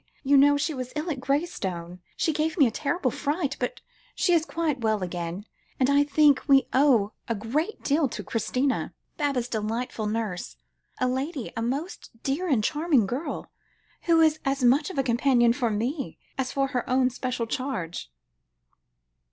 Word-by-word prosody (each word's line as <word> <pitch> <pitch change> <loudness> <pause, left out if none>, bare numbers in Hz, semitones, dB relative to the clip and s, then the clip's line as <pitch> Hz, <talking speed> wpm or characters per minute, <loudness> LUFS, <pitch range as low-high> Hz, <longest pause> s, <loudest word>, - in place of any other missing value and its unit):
You 280 +1 +4
know 285 +1 +6
she 310 +2 -1
was 255 -2 -5
ill 310 +3 -2
at 275 - -3
Graystone. 190 - -2 0.2
She 320 - +1
gave 310 +3 -1
me 290 - +6
a 235 - +1
terrible 285 +1 -1
fright, 285 +1 -1
but - - -3 0.3
she 355 - +2
is 325 -2 +3
quite 310 -6 -1
well 215 -3 +1
again, 175 +2 -4 0.3
and 260 +1 +3
I 285 +1 +5
think 290 -1 +4
we 275 -2 +5
owe 255 -7 +4 0.2
a 230 - -1
great 280 - -2
deal 290 +1 +2
to - - -6
Christina, 255 +4 -1 0.2
Baba's 275 -5 0
delightful 225 0 -3
nurse 210 - -3 0.4
a 255 - +1
lady, 265 +1 -3
a 225 - -2
most 275 +10 -3
dear 315 +7 -1
and 240 -7 +2
charming 300 -4 +2
girl, 255 - -4 0.5
who 335 -1 +4
is 310 -1 +4
as 270 -1 -1
much 275 +6 +4
of 375 - -8
a 270 - +2
companion 240 -1 +3
for 245 -2 0
me, 245 +7 -2 0.2
as 265 -2 -2
for 275 -1 0
her 250 -2 -2
own 255 0 +3
special 250 -1 -3
charge." 225 - -4
265 Hz, 170 wpm, -26 LUFS, 230-290 Hz, 0.5 s, know